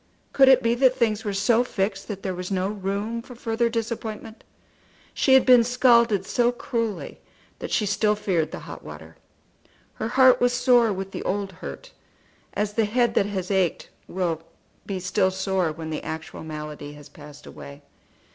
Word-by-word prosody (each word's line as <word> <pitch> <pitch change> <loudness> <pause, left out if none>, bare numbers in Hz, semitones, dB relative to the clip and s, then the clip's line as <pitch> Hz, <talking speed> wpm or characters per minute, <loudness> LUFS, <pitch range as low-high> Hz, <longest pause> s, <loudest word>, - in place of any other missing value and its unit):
Could 270 -1 +6
it 260 -1 +6
be 230 0 +2
that 255 +1 +3
things 220 -4 +1
were 205 - -2
so 225 +5 +2
fixed 195 -4 -3
that 200 -3 -6
there 190 - -2
was 180 0 -6
no 190 -1 -1
room 205 +3 -3
for 250 +1 -12
further 235 0 -1
disappointment? 225 -1 -5 0.7
She 265 - +4
had 265 - +5
been 250 -2 +7
scalded 235 -4 +3
so 240 +3 +2
cruelly 230 -3 -4 0.4
that - - -6
she 215 - +1
still 210 +1 +1
feared 180 -6 -1
the - - -7
hot - - -10
water. 80 +1 -11 0.8
Her - - -4
heart 260 +1 +5
was 245 0 +3
sore 245 -2 +4
with 195 0 -5
the - - -5
old 200 0 -2
hurt, - - -9 0.6
as 210 0 -1
the 225 0 +2
head 240 +3 +1
that 200 - +2
has 190 -2 -4
ached 190 -4 0 0.2
will 170 -3 -2 0.5
be 195 -2 -3
still 185 +1 +1
sore 190 -2 -1
when 160 0 -7
the 155 - -3
actual 160 0 -7
malady 150 -2 -7
has 145 -1 -13
passed 150 -1 -14
away. 140 +1 -11
205 Hz, 175 wpm, -24 LUFS, 185-235 Hz, 0.8 s, been